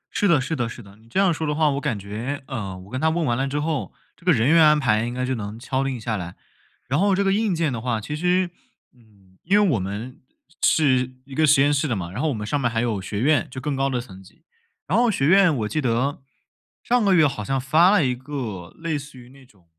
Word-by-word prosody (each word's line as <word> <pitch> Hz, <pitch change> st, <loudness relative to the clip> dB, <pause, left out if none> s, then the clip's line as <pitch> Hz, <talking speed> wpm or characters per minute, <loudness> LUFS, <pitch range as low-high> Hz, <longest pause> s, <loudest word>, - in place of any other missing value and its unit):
是 205 Hz, -, +2 dB
的 170 Hz, -6 st, +4 dB
是 140 Hz, +5 st, -2 dB
的 120 Hz, -3 st, -2 dB
是 120 Hz, -, -10 dB
的， 100 Hz, 0 st, -16 dB
你 110 Hz, -, -22 dB
这 190 Hz, -, -1 dB
样 195 Hz, -3 st, +4 dB
说 160 Hz, 0 st, -3 dB
的 150 Hz, -, -1 dB
话， 155 Hz, -1 st, +3 dB
我 140 Hz, +1 st, -2 dB
感 110 Hz, -, -1 dB
觉 115 Hz, +8 st, -5 dB
呃， 105 Hz, -9 st, -5 dB
我 95 Hz, +2 st, -13 dB
跟 130 Hz, -, -3 dB
他 160 Hz, -, +3 dB
问 165 Hz, 0 st, 0 dB
完 120 Hz, -4 st, +1 dB
了 135 Hz, +2 st, -1 dB
之 145 Hz, +2 st, -2 dB
后， 155 Hz, -2 st, -2 dB, 0.2 s
这 -, -, -24 dB
个 180 Hz, -, +5 dB
人 120 Hz, -3 st, +2 dB
员 165 Hz, 0 st, +6 dB
安 150 Hz, -1 st, +5 dB
排 110 Hz, -4 st, +1 dB
应 120 Hz, -, -4 dB
该 125 Hz, +1 st, -2 dB
就 130 Hz, -, -1 dB
能 105 Hz, -2 st, -5 dB
敲 130 Hz, +1 st, -2 dB
定 135 Hz, -3 st, -3 dB
下 110 Hz, 0 st, -3 dB
来。 90 Hz, -1 st, -7 dB, 0.5 s
然 140 Hz, +6 st, 0 dB
后 200 Hz, 0 st, +3 dB
这 200 Hz, -, +1 dB
个 195 Hz, -, +2 dB
硬 205 Hz, -3 st, +1 dB
件 160 Hz, -5 st, 0 dB
的 115 Hz, -, -4 dB
话， 120 Hz, -3 st, -1 dB
其 150 Hz, +8 st, -5 dB
实 180 Hz, +2 st, +1 dB, 0.4 s
嗯， 100 Hz, -6 st, -25 dB
因 200 Hz, +5 st, +3 dB
为 205 Hz, -, +3 dB
我 110 Hz, -, +1 dB
们 105 Hz, +7 st, -6 dB, 0.4 s
是 130 Hz, -4 st, +3 dB
一 135 Hz, -, -12 dB
个 155 Hz, +2 st, +2 dB
实 140 Hz, -1 st, +5 dB
验 145 Hz, +1 st, +3 dB
室 145 Hz, +2 st, 0 dB
的 120 Hz, -, -1 dB
嘛， 85 Hz, -3 st, -5 dB
然 110 Hz, -, -4 dB
后 160 Hz, -, +1 dB
我 -, -, -1 dB
们 105 Hz, -2 st, -5 dB
上 140 Hz, +6 st, -1 dB
面 120 Hz, -, +1 dB
儿 120 Hz, -, -9 dB
还 115 Hz, -, +1 dB
有 110 Hz, -5 st, -1 dB
学 100 Hz, +2 st, -4 dB
院， 145 Hz, 0 st, +2 dB
就 130 Hz, -, -7 dB
更 145 Hz, +1 st, -3 dB
高 135 Hz, +1 st, 0 dB
的 125 Hz, -2 st, -1 dB
层 95 Hz, -6 st, -10 dB
级。 95 Hz, -, -20 dB, 0.4 s
然 185 Hz, +9 st, 0 dB
后 240 Hz, -1 st, +4 dB
学 135 Hz, -10 st, 0 dB
院 185 Hz, 0 st, +5 dB
我 110 Hz, -3 st, -2 dB
记 155 Hz, +7 st, -2 dB
得 130 Hz, +3 st, -1 dB, 0.6 s
上 245 Hz, -2 st, +2 dB
个 195 Hz, -2 st, +4 dB
月 160 Hz, -3 st, +5 dB
好 120 Hz, -7 st, -2 dB
像 135 Hz, +4 st, -1 dB
发 155 Hz, +7 st, +4 dB
了 195 Hz, -8 st, +4 dB
一 125 Hz, -, +1 dB
个 120 Hz, -9 st, -6 dB
类 165 Hz, -3 st, -2 dB
似 140 Hz, -2 st, -12 dB
于 125 Hz, 0 st, -14 dB
那 135 Hz, 0 st, -17 dB
种 100 Hz, -8 st, -25 dB
135 Hz, 300 characters per minute, -23 LUFS, 115-155 Hz, 0.6 s, 员